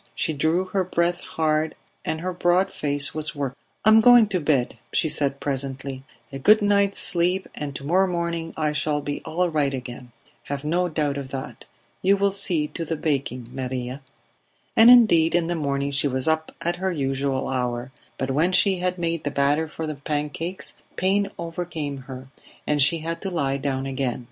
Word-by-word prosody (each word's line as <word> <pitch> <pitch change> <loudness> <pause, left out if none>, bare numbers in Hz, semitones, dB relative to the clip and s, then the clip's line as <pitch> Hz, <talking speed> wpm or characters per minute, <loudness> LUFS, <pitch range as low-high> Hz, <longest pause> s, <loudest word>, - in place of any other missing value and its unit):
She 160 - -1
drew 160 +5 +1
her 185 +1 -1
breath 175 -1 0
hard, 160 -3 -1 0.3
and 160 0 -3
her 185 +1 -3
broad 175 +2 +2
face 145 -1 +1
was 155 -1 -3
working. 140 -2 -3 0.3
"I - - +7
am 220 +1 +7
going 245 0 +8
to 185 -3 0
bed," 140 -5 0
she - - +1
said 140 -2 0
presently. 135 -1 -4 0.3
"A 135 - -5
good 215 +10 +6
night's 200 -1 +2
sleep, 180 +2 +2
and 145 -2 -6
to - - -6
morrow 185 +6 +3
morning 170 -2 -2
I 155 -1 +1
shall 150 0 0
be 145 0 -4
all 170 +3 0
right 145 -4 0
again; 125 -1 -8 0.3
have 140 0 -4
no 175 +3 +1
doubt 150 -3 -1
of 135 -2 -6
that. 135 0 -7 0.4
You 195 +2 +4
will 200 0 +2
see 185 -6 +1
to 165 - -4
the 165 0 -2
baking, 135 -6 -2
Maria." 130 0 -4 0.7
And 225 +2 +8
indeed 175 -10 +6
in 175 -1 +2
the 175 - -1
morning 140 -2 -1
she 140 +1 +1
was 130 0 -2
up 160 0 0
at 175 +1 -1
her 190 +1 -1
usual 135 -3 -1
hour, 125 -1 -2 0.3
but 135 0 -2
when 165 +7 +2
she 190 +1 +4
had 180 0 -1
made 170 -2 -2
the 145 - -1
batter 145 +3 +1
for 160 +1 -6
the 155 - -3
pancakes 150 +5 -3 0.2
pain 200 +2 +1
overcame 165 -4 -4
her, 130 0 -8 0.4
and 150 -1 +2
she 155 +4 +5
had 165 +1 -4
to 195 - -3
lie 140 -6 -1
down 135 -1 -2
again. 135 -2 -2
155 Hz, 190 wpm, -24 LUFS, 140-175 Hz, 0.7 s, going